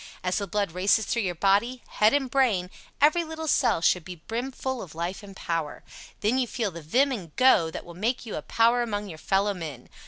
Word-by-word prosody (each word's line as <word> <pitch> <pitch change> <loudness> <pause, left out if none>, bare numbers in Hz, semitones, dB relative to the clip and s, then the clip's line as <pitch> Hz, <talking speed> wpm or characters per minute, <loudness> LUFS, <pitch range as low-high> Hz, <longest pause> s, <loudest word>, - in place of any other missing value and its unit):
As 185 +3 0
the 200 - -4
blood 200 -1 -1
races 195 +5 +2
through 235 - 0
your 180 -4 -2
body 205 +8 +1
head 215 +1 +3
and 285 -2 +1
brain, 230 -9 +1 0.3
every 310 +4 +4
little 320 0 -6
cell 240 - +2
should 180 0 +3
be 180 +2 -8
brim 230 +10 -4
full 260 -1 -4
of 160 -4 -10
life 170 +5 -3
and 200 -2 -12
power. 165 -5 -3 0.4
Then 225 +5 +2
you 250 - 0
feel 225 -5 -2
the 170 0 -8
vim 255 - +2
and 180 - -6
"go" 255 -11 +5
that - - -7
will 170 - -10
make 230 +8 -2
you 220 - -5
a - - -3
power 235 +6 +3
among 205 -3 -3
your 160 -3 -9
fellow 200 +4 +1
men. 155 -9 -8
205 Hz, 225 wpm, -26 LUFS, 180-245 Hz, 0.4 s, go